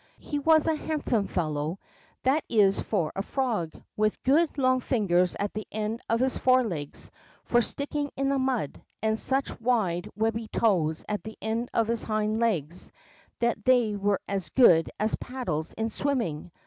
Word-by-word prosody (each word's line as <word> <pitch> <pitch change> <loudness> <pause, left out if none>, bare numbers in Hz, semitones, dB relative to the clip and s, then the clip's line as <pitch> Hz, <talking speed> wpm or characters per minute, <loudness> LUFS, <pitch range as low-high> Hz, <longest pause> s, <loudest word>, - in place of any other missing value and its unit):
He 290 - -4
was 315 +1 +4
a 320 - +3
handsome 295 -9 -1
fellow, 155 0 -2 0.5
that 275 +4 +2
is 200 -4 +4
for 175 -8 -1
a 195 - -1
frog, 220 - -1 0.2
with 215 0 0
good 300 +4 +3
long 255 -1 +3
fingers 185 -9 +1
at 205 0 -2
the 215 0 -5
end 215 +2 -3
of 230 - +2
his 260 0 0
forelegs 225 - 0 0.3
for 240 - +3
sticking 285 +3 -2
in 275 0 0
the 275 0 +1
mud, 260 - -1 0.2
and 220 0 +1
such 265 -2 -1
wide, 210 -8 +1
wehhy 225 0 -1
toes 165 -8 +1
at 210 -1 -2
the 220 0 -9
end 225 +2 -2
of 225 -1 +1
his 230 0 0
hind 215 0 -1
legs 180 -8 0 0.5
that 235 -3 +1
they 240 -4 +3
were 200 -1 +1
as 195 -2 -2
good 175 -11 +5
as 215 +1 +1
paddles 235 - -4
in 225 0 -2
swimming. 220 - -2
220 Hz, 165 wpm, -27 LUFS, 195-255 Hz, 0.5 s, good